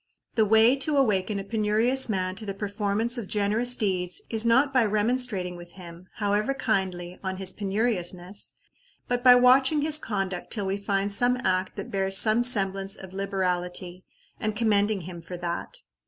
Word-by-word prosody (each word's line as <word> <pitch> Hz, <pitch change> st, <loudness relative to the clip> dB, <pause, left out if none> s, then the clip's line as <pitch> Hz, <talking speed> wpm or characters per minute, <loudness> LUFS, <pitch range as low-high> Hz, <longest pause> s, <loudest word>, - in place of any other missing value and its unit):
The 220 Hz, -, +2 dB
way 220 Hz, +4 st, +5 dB
to 290 Hz, +2 st, 0 dB
awaken 210 Hz, -6 st, +1 dB
a 195 Hz, -, -4 dB
penurious 225 Hz, +5 st, +2 dB
man 185 Hz, -3 st, -1 dB
to 220 Hz, -, -6 dB
the 195 Hz, -, -4 dB
performance 210 Hz, +4 st, -1 dB
of 215 Hz, -, -7 dB
generous 215 Hz, +5 st, +1 dB
deeds 180 Hz, -6 st, -1 dB
is 225 Hz, 0 st, 0 dB
not 265 Hz, +4 st, +3 dB
by 255 Hz, -3 st, +4 dB
remonstrating 210 Hz, -3 st, 0 dB
with 175 Hz, 0 st, -12 dB
him, 175 Hz, -1 st, -12 dB
however 210 Hz, +5 st, 0 dB
kindly, 185 Hz, -7 st, -2 dB
on 190 Hz, 0 st, -3 dB
his 190 Hz, -1 st, -1 dB
penuriousness, 195 Hz, -3 st, -3 dB, 0.5 s
but 245 Hz, 0 st, -2 dB
by 250 Hz, -1 st, +8 dB
watching 265 Hz, +4 st, +4 dB
his 305 Hz, 0 st, +3 dB
conduct 195 Hz, -7 st, -4 dB
till 205 Hz, -3 st, -1 dB
we 190 Hz, +1 st, -1 dB
find 200 Hz, 0 st, -1 dB
some 245 Hz, +4 st, +2 dB
act 185 Hz, 0 st, -1 dB
that -, -, -7 dB
bears 195 Hz, 0 st, +2 dB
some 220 Hz, +2 st, +4 dB
semblance 195 Hz, -4 st, +1 dB
of 190 Hz, -1 st, -11 dB
liberality, 180 Hz, -2 st, -3 dB, 0.4 s
and 215 Hz, -1 st, -2 dB
commending 210 Hz, -2 st, +1 dB
him 170 Hz, 0 st, -9 dB
for 175 Hz, +2 st, -8 dB
that. 170 Hz, 0 st, -5 dB
200 Hz, 170 wpm, -26 LUFS, 185-230 Hz, 0.5 s, by